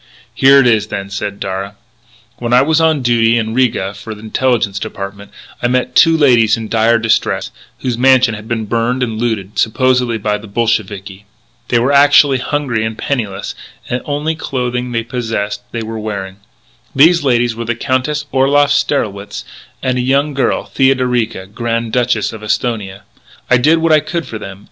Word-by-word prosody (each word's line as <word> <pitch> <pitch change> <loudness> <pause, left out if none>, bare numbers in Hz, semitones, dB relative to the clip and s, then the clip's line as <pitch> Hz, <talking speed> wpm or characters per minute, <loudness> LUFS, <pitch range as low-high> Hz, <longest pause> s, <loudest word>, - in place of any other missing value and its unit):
"Here 135 +1 +5
it 135 - +4
is 110 -3 +2
then," 100 -2 -5
said 100 0 -4
Darragh. 95 +1 -4 0.6
"When 120 0 -2
I 125 +1 +6
was 160 +2 +2
on 160 -4 +2
duty 120 -1 +3
in 110 -1 -2
Riga 115 -6 0
for 110 +2 -8
the 105 - -13
Intelligence 110 -3 0
Department, 100 -1 -7 0.3
I 120 - +1
met 125 0 0
two 165 -1 +5
ladies 120 -8 +4
in 110 -1 -6
dire 115 +1 +3
distress, 110 0 0 0.3
whose 125 -2 -2
mansion 130 -2 +4
had 105 0 -8
been 115 -2 -2
burned 120 +4 0
and 110 -3 -3
looted, 110 -4 -2
supposedly 125 0 +1
by 105 0 -1
the 110 - -12
Bolsheviki. 105 -3 -2 0.4
"They 120 - +2
were 125 +4 +2
actually 140 -1 +5
hungry 125 -4 -2
and 110 0 -4
penniless; 105 -8 -3 0.4
the 125 +1 -1
only 150 +2 -1
clothing 125 -5 -3
they 115 -1 -1
possessed 115 -4 -3
they 115 -1 -4
were 110 0 -5
wearing. 100 -3 -5 0.6
These 165 +4 +5
ladies 120 -3 +2
were 115 +1 -5
the 120 +1 -1
Countess 130 +5 -1
Orloff 140 +2 +3
Strelwitz, 105 -8 -1 0.4
and 125 -1 0
a - - +1
young 140 +3 +1
girl, 135 - 0
Theodorica, 125 -6 0
Grand 115 +2 -3
Duchess 120 -4 0
of 110 - -9
Esthonia.... 105 -3 -2 0.5
I 125 - +6
did 155 +7 +3
what 165 0 +1
I 155 - +6
could 170 +2 -4
for 110 - -7
them. 95 -1 -9
120 Hz, 175 wpm, -15 LUFS, 110-130 Hz, 0.6 s, I